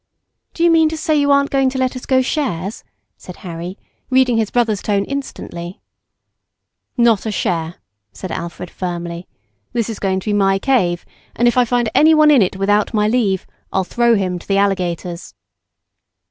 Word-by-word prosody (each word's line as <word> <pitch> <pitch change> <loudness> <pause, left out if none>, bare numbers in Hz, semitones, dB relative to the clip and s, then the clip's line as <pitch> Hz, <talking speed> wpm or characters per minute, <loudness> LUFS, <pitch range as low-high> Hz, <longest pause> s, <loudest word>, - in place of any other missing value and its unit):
"Do 335 - -1
you 340 - +5
mean 320 -1 +4
to 320 - -5
say 315 -1 0
you 285 -1 +2
aren't 280 0 +3
going 270 -1 +2
to 265 - -5
let 260 0 0
us 255 - -8
go 260 -1 +3
shares," 220 - -3 0.3
said 180 - -11
Harry, 175 +2 -6 0.3
reading 255 -2 +3
his 220 -2 0
brother's 225 -4 0
tone 200 -1 0
instantly. 190 -10 -6 1.2
"Not 230 -3 +3
a - - -1
share," 170 -3 -2 0.4
said 185 - -8
Alfred 170 0 -6
firmly, 175 -1 -5 0.5
"this 235 -2 -1
is 220 - -7
going 190 -1 0
to 215 - -5
be - - 0
my 195 -1 +3
cave, 190 -8 +1 0.3
and 240 - +2
if 240 - +2
I 250 -1 +4
find 240 0 0
anyone 310 -1 +6
in 275 -5 +6
it 190 0 +1
without 205 +3 +1
my 210 0 +2
leave, 215 -5 +1 0.3
I'll 190 - +1
throw 235 +4 +2
him 185 -3 -1
to - - -16
the 195 - +1
alligators." 180 -3 -2
210 Hz, 180 wpm, -18 LUFS, 185-255 Hz, 1.2 s, anyone